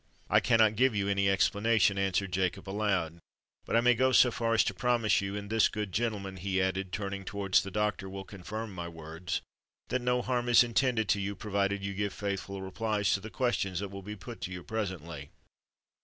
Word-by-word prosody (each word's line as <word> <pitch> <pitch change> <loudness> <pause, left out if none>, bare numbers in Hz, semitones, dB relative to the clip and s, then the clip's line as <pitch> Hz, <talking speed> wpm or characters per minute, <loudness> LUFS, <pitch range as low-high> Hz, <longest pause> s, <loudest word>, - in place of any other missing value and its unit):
"I - - +6
cannot 110 -2 +4
give 125 0 +3
you 100 -1 0
any 100 -1 +2
explanation," 100 +1 +3
answered 95 0 0
Jacob 95 +1 -1
aloud. 95 -5 -1 0.5
"But - - -1
I 115 - +5
may 125 +1 +5
go 130 +2 +2
so 125 -1 +6
far 115 0 0
as - - +5
to - - -1
promise 120 -5 +2
you—and 100 +1 -5
this 110 -1 +4
good 105 -3 -4
gentleman," 100 -3 -2
he 95 +1 -1
added, 95 0 -1
turning 100 0 -4
towards 95 -1 +1
the 100 - -6
doctor, 105 -1 -1
"will 95 0 -6
confirm 105 +2 -7
my 85 -2 -5
words—that 85 +9 -6
no 125 0 +1
harm 125 -1 -1
is 120 0 +7
intended 120 -2 +1
to 100 - +2
you, 100 +1 -3
provided 100 -1 -1
you 100 0 -3
give 100 0 -2
faithful 100 -1 -4
replies 105 +1 0
to - - +1
the 110 +3 -8
questions 100 -8 -1
that 100 -1 -4
will 100 0 -7
be 105 +2 -7
put 115 +4 -10
to 90 - -4
you 90 -1 -6
presently." 85 -9 -5
100 Hz, 200 wpm, -30 LUFS, 95-110 Hz, 0.5 s, is